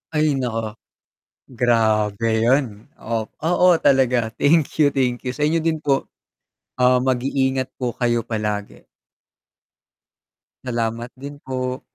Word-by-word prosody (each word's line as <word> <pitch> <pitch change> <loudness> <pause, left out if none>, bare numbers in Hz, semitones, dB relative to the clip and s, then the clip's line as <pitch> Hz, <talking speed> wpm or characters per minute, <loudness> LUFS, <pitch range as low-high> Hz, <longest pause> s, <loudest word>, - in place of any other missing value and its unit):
Ay 150 -3 +2
naku, 115 -3 -2 0.8
grabe 115 -3 +1
yun 120 -4 0
oh, 110 -1 -3 0.2
oo 180 +1 +4
talaga. 125 -4 +2
Thank 155 0 +2
you, 145 - +4
thank 125 -3 -1
you 125 - -3
sa 145 +4 -1
inyo 165 +1 +1
din 160 -1 0
po. 140 -2 -1 0.7
Oo, 125 0 +4
mag-iingat 130 +1 0
po 125 -2 -2
kayo 120 -1 +1
palagi. 105 -2 -4 1.8
Salamat 115 -1 -3
din 140 +2 -8
po. 130 0 -4
125 Hz, 115 wpm, -21 LUFS, 115-135 Hz, 1.8 s, oo